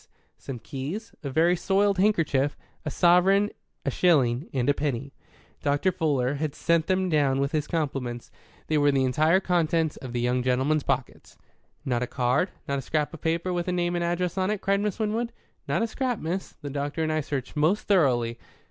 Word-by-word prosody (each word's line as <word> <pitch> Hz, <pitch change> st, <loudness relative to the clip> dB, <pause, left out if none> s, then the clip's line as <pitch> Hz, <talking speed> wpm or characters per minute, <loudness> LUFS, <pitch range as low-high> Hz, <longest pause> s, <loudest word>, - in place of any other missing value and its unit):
some 135 Hz, -, -6 dB
keys, 150 Hz, -, -6 dB
a 140 Hz, -, -4 dB
very 165 Hz, +6 st, +3 dB
soiled 195 Hz, +2 st, +2 dB
handkerchief, 160 Hz, -9 st, +2 dB, 0.3 s
a 155 Hz, -, -3 dB
sovereign, 190 Hz, +5 st, +4 dB, 0.3 s
a -, -, +1 dB
shilling 135 Hz, -6 st, +2 dB
and 125 Hz, -3 st, -1 dB
a 145 Hz, -, +5 dB
penny. 140 Hz, -2 st, -3 dB, 0.5 s
Dr. 145 Hz, +6 st, +1 dB
Fuller 145 Hz, -7 st, 0 dB
had 155 Hz, -2 st, -2 dB
sent 170 Hz, -1 st, +1 dB
them 185 Hz, 0 st, +1 dB
down 145 Hz, -5 st, +2 dB
with 140 Hz, 0 st, 0 dB
his 150 Hz, -2 st, -1 dB
compliments; 135 Hz, -7 st, -3 dB, 0.3 s
they 155 Hz, -1 st, +1 dB
were 145 Hz, 0 st, +4 dB
the 135 Hz, -1 st, +2 dB
entire 155 Hz, +8 st, +3 dB
contents 165 Hz, -4 st, +1 dB
of 130 Hz, -2 st, -8 dB
the 120 Hz, -, -2 dB
young 125 Hz, +1 st, +1 dB
gentleman's 130 Hz, +5 st, +1 dB
pockets. 135 Hz, -3 st, -3 dB, 0.5 s
"Not 125 Hz, -3 st, 0 dB
a 125 Hz, -, -1 dB
card, 130 Hz, +9 st, +1 dB, 0.2 s
not 140 Hz, 0 st, -1 dB
a -, -, -4 dB
scrap 150 Hz, +3 st, -1 dB
of 165 Hz, -, -9 dB
paper 170 Hz, +3 st, 0 dB
with 175 Hz, 0 st, -2 dB
a -, -, +1 dB
name 175 Hz, -1 st, 0 dB
and 175 Hz, 0 st, 0 dB
address 175 Hz, +2 st, -1 dB
on 185 Hz, +1 st, +1 dB
it?" 210 Hz, -1 st, -1 dB
cried 195 Hz, +1 st, +1 dB
Miss 210 Hz, -2 st, -1 dB
Winwood. 225 Hz, +2 st, -1 dB, 0.4 s
"Not -, -, +1 dB
a -, -, +1 dB
scrap, 250 Hz, +1 st, -2 dB
miss. 180 Hz, +3 st, -4 dB
The 145 Hz, -, -4 dB
doctor 145 Hz, +3 st, -2 dB
and 155 Hz, -, 0 dB
I 155 Hz, 0 st, +1 dB
searched 140 Hz, -3 st, -4 dB
most 160 Hz, +8 st, +1 dB
thoroughly." 120 Hz, -, +2 dB
155 Hz, 195 wpm, -26 LUFS, 135-180 Hz, 0.5 s, a